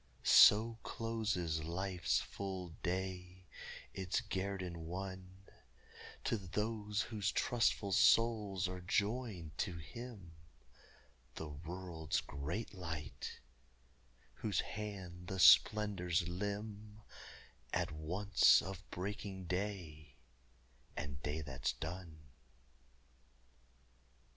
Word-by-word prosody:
So 115 +2 +7
closes 105 -9 -1
life's 90 +2 0
full 95 -3 -5
day, 90 0 -3 0.5
its 95 -1 -1
guerdon 95 -4 -3
won, 95 +1 -6 0.8
To 115 - +1
those 105 +2 -1
whose 105 -4 -1
trustful 115 -4 +1
souls 105 -3 +4
are 90 0 -5
joined 100 -4 -1
to 85 - -1
Him 100 - -9 1.0
The 80 - -5
world's 80 +1 -3
great 75 +13 -4
Light 80 -6 -6 0.9
whose 100 -5 0
hand 95 -4 -6
the 95 - -3
splendors 95 -3 +5
limn 105 +3 -5 0.7
At - - 0
once 90 +6 +4
of 95 +1 -6
breaking 95 0 -5
day 85 -7 -4 0.8
and 70 -1 -5
day 75 +2 -2
that's 65 -5 -2
done. 80 -1 -7
95 Hz, 85 wpm, -36 LUFS, 85-105 Hz, 1.0 s, So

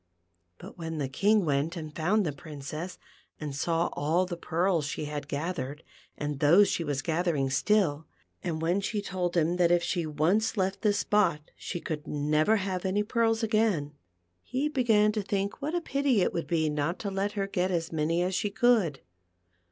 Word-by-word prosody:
But - - -12
when 160 -1 -4
the 140 -3 -1
King 200 +9 +2
went 150 +4 0
and 155 -2 -7
found 195 +6 +2
the 155 - 0
Princess, 155 +4 -7 0.4
and 150 -3 -5
saw 165 +4 0
all 165 +5 +1
the 180 -1 -5
pearls 170 -2 0
she 150 - -4
had 145 -1 -5
gathered, 145 -1 -4 0.3
and 145 -1 -3
those 175 +8 +6
she 170 - -1
was 145 -3 -2
gathering 160 -5 0
still, 160 -1 +1 0.4
and 160 -3 -2
when 175 +4 +1
she 210 +2 -2
told 180 -3 -2
him 170 +2 +2
that 175 -1 +4
if 175 0 +3
she 170 -3 -1
once 175 +10 +1
left 190 0 0
this 205 -2 +2
spot 175 -10 +1
she 175 - -5
could 150 -3 -5
never 150 +7 +2
have 185 -3 -2
any 200 +2 +1
pearls 225 +1 +1
again, 215 -10 +1 0.5
he 265 - -1
began 225 -7 +3
to 210 0 -1
think 200 +4 -2
what 305 +4 -2
a 350 - 0
pity 275 - +1
it - - +1
would 170 - -3
be 160 -2 +1
not 150 +3 -1
to 200 - -4
let 195 +2 -1
her 200 -2 -1
get 185 -1 -1
as 170 -2 -1
many 165 +2 +1
as 185 +1 -1
she 205 +3 0
could. 210 - +2
175 Hz, 190 wpm, -28 LUFS, 155-205 Hz, 0.5 s, those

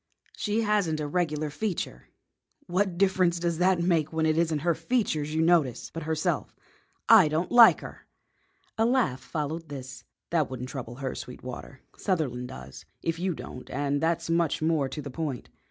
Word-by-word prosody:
"She 210 +1 0
hasn't 205 -8 +1
a 150 - -2
regular 155 -1 -1
feature." 170 - -4 0.6
"What 185 0 0
difference 185 -2 +3
does 170 -1 -1
that 185 0 +3
make 165 -4 +1
when 160 -1 0
it 155 -1 +2
isn't 165 -1 +1
her 170 - +4
features 160 -5 -1
you 160 - +2
notice, 160 -7 +2
but 165 - -5
herself?" 155 -1 -1 0.5
"I 220 -8 +8
don't 155 +4 -1
like 240 -2 +8
her." - - -11 0.7
A 225 - +4
laugh 240 - +1
followed 155 +1 -4
this. 130 -3 -8 0.3
"That 160 -5 +2
won't 130 -1 -5
trouble 125 -3 -6
her, 130 0 -4
Sweetwater. 125 +1 -8 0.2
Sutherland 135 - -1
does, 65 - -10 0.2
if 165 0 -1
you 180 -1 -1
don't, 125 - -9
and 145 0 -1
that's 165 0 0
much 165 -1 +1
more 155 -4 +1
to 150 +2 -6
the 140 - -6
point. 145 -4 -4
160 Hz, 170 wpm, -27 LUFS, 140-175 Hz, 0.7 s, I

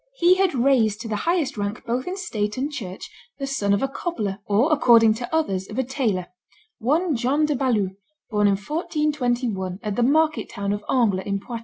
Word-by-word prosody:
He 355 -6 +5
had 375 -4 +1
raised 235 -5 +3
to 230 - -6
the 220 - -2
highest 340 -9 0
rank 205 +3 -3
both 245 +5 -2
in 370 +2 -3
state 210 - -3
and 280 +4 -2
church 195 -11 -6 0.3
the 275 - -3
son 265 -7 -1
of 200 +4 +2
a - - +2
cobbler, 225 - -3
or, 230 +10 +3
according 230 -6 +6
to 235 +2 -6
others, 195 -13 -1
of 215 - -7
a 260 - +2
tailor, 235 -8 -1 0.5
one 305 +7 +1
John 265 +6 +1
de 300 -1 0
Balue, 230 -8 +1 0.4
born 210 -1 +3
in 200 - +4
1421, 245 - -1
at 210 -2 -2
the - - 0
market 310 +5 +2
town 200 0 -2
of 205 0 -4
Angles, 205 -8 +1
in 200 0 -1
Poitou. 235 +3 -6
240 Hz, 200 wpm, -23 LUFS, 205-295 Hz, 0.5 s, according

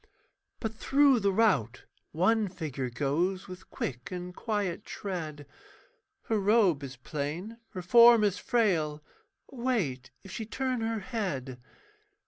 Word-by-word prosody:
But 220 -2 -3
through 275 +2 +4
the 200 -1 +2
rout 185 - +2 0.3
one 210 +6 +2
figure 145 -8 -4
goes 165 +10 -1
With 185 0 -11
quick 120 -2 -5
and 180 0 -6
quiet 205 -6 -2
tread; 160 -7 -5 0.8
Her 220 -2 0
robe 200 -7 +3
is 135 -1 -7
plain, 155 - -5 0.2
her 185 - -5
form 235 +3 +7
is 205 -2 +1
frail 160 -10 +1 0.5
Wait 220 - -1
if 195 - -11
she 220 - -4
turn 255 0 -2
her 225 -1 -1
head. 145 - -4
185 Hz, 125 wpm, -29 LUFS, 150-225 Hz, 0.8 s, form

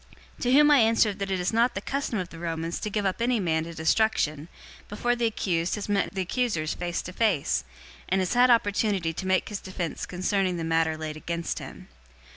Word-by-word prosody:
025:016 - - -17
To 245 - +2
whom 295 +2 +7
I 290 - +7
answered 220 -3 +3
that 195 0 -3
it 190 -1 0
is 180 +4 -1
not 235 +2 +2
the - - -1
custom 270 +1 -2
of 180 -2 -3
the 165 - -11
Romans 165 0 -3
to 210 - -3
give 205 0 -1
up 190 +4 -1
any 240 0 +2
man 160 -4 0
to 170 - -8
destruction, 160 -3 +1 0.4
before 240 +4 0
the 240 -1 +1
accused 175 -6 -1
has 210 - -5
met 205 -1 0
the 190 - 0
accusers 180 -7 -1
face 175 -1 -3
to 185 - -8
face, 200 -9 +1 0.5
and 190 - +2
has 185 +2 0
had 250 +1 +5
opportunity 205 -6 +2
to 185 - -5
make 185 0 +1
his 205 -2 -5
defense 185 -3 -4
concerning 185 0 0
the 165 - -3
matter 160 -1 +1
laid 155 -1 -5
against 170 +1 -3
him. - - -10
190 Hz, 220 wpm, -26 LUFS, 170-220 Hz, 0.5 s, whom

